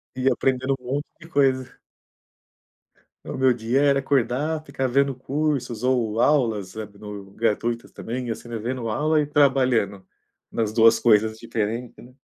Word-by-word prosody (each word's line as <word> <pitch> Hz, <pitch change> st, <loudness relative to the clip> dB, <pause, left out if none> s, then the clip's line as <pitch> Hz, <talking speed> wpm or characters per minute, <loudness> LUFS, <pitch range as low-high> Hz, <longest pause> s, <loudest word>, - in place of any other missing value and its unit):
E 130 Hz, 0 st, -3 dB
eu -, -, +5 dB
aprendendo 130 Hz, +1 st, 0 dB
um -, -, -23 dB
monte 140 Hz, +4 st, -2 dB
de 165 Hz, -, -13 dB
coisa. 135 Hz, -4 st, +1 dB, 1.5 s
O -, -, -5 dB
meu 130 Hz, 0 st, +4 dB
dia 120 Hz, +4 st, 0 dB
era 140 Hz, -1 st, +4 dB
acordar, 140 Hz, +4 st, 0 dB
ficar 140 Hz, -3 st, -2 dB
vendo 140 Hz, +2 st, +2 dB
cursos 130 Hz, -3 st, -2 dB
ou 120 Hz, -3 st, +1 dB
aulas, 115 Hz, -10 st, +2 dB
sabe, 105 Hz, -1 st, -8 dB
no 100 Hz, -2 st, -9 dB
gratuitas, 115 Hz, +2 st, -1 dB
também, 120 Hz, 0 st, -5 dB
assim, 115 Hz, -, -7 dB
né, 120 Hz, -1 st, -4 dB
vendo 120 Hz, +2 st, -3 dB
aula 150 Hz, +8 st, +1 dB
e 145 Hz, -, -2 dB
trabalhando, 130 Hz, -9 st, +2 dB, 0.4 s
nas 110 Hz, -2 st, -1 dB
2 115 Hz, 0 st, +5 dB
coisas 110 Hz, -1 st, +3 dB
diferentes, 115 Hz, +1 st, -3 dB
né. 125 Hz, +1 st, -14 dB
125 Hz, 155 wpm, -24 LUFS, 110-135 Hz, 1.5 s, eu